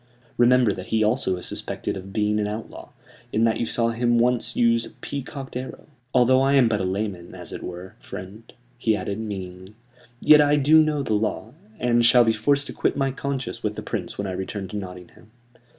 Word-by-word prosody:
Remember 120 Hz, -3 st, +4 dB
that 95 Hz, -1 st, -8 dB
he 110 Hz, -1 st, +1 dB
also 105 Hz, -4 st, +1 dB
is 90 Hz, -, -8 dB
suspected -, -, -4 dB
of 95 Hz, 0 st, -8 dB
being 105 Hz, 0 st, +1 dB
an 105 Hz, -, 0 dB
outlaw, 105 Hz, +2 st, -7 dB, 0.4 s
in 110 Hz, -, +1 dB
that 115 Hz, -1 st, +2 dB
you 115 Hz, -, -1 dB
saw 115 Hz, 0 st, 0 dB
him 120 Hz, +1 st, +1 dB
once 120 Hz, 0 st, +1 dB
use 115 Hz, -1 st, +3 dB
a -, -, -8 dB
peacocked 135 Hz, -1 st, -7 dB
arrow. 130 Hz, +1 st, -6 dB, 0.3 s
Although 130 Hz, +1 st, +4 dB
I 135 Hz, +1 st, +3 dB
am 135 Hz, -4 st, +5 dB
but 105 Hz, -3 st, 0 dB
a -, -, -1 dB
layman, 95 Hz, -2 st, -3 dB
as -, -, -8 dB
it -, -, -6 dB
were, 90 Hz, +1 st, -8 dB
friend," 100 Hz, +5 st, -10 dB, 0.3 s
he 110 Hz, -2 st, +2 dB
added, 100 Hz, 0 st, -4 dB
meaningly, 95 Hz, -2 st, -7 dB, 0.4 s
"yet 150 Hz, -1 st, +7 dB
I 145 Hz, 0 st, +4 dB
do 150 Hz, +2 st, +6 dB
know 150 Hz, -2 st, 0 dB
the 110 Hz, -, -1 dB
law, 105 Hz, +1 st, -2 dB, 0.3 s
and 120 Hz, 0 st, +2 dB
shall 120 Hz, +1 st, +6 dB
be 115 Hz, -1 st, +2 dB
forced 140 Hz, +6 st, +1 dB
to -, -, -8 dB
quit -, -, 0 dB
my 135 Hz, -1 st, +1 dB
conscience 135 Hz, -1 st, -4 dB
with -, -, -2 dB
the -, -, -6 dB
Prince -, -, -4 dB
when 100 Hz, -, -3 dB
I 95 Hz, -, -3 dB
return 95 Hz, +1 st, -4 dB
to 105 Hz, -, -7 dB
Nottingham. 90 Hz, +1 st, -10 dB
115 Hz, 210 wpm, -24 LUFS, 100-125 Hz, 0.4 s, yet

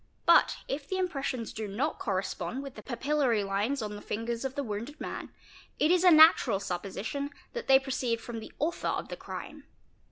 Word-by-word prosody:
But -, -, +5 dB
if 280 Hz, +1 st, -4 dB
the 375 Hz, -, -1 dB
impressions 275 Hz, -10 st, -2 dB
do 215 Hz, -1 st, -4 dB
not 250 Hz, +11 st, -2 dB
correspond 195 Hz, +4 st, -2 dB
with 275 Hz, -2 st, -8 dB
the -, -, -10 dB
papillary 265 Hz, -3 st, +1 dB
lines 210 Hz, +7 st, 0 dB
on 210 Hz, -1 st, -4 dB
the 205 Hz, -, -8 dB
fingers 230 Hz, +2 st, -3 dB
of 265 Hz, 0 st, -3 dB
the 285 Hz, -, -1 dB
wounded 230 Hz, +6 st, -5 dB
man, -, -, -5 dB, 0.5 s
it 305 Hz, -, +3 dB
is 360 Hz, 0 st, +4 dB
a 365 Hz, -, +8 dB
natural 310 Hz, -, +7 dB
supposition 200 Hz, +10 st, -4 dB, 0.2 s
that 475 Hz, -, -5 dB
they 270 Hz, -, +8 dB
proceed 260 Hz, -3 st, -1 dB
from 230 Hz, 0 st, -6 dB
the 220 Hz, -, -10 dB
author 325 Hz, +4 st, -1 dB
of -, -, -2 dB
the -, -, -4 dB
crime. -, -, -8 dB
255 Hz, 190 wpm, -30 LUFS, 215-285 Hz, 0.5 s, a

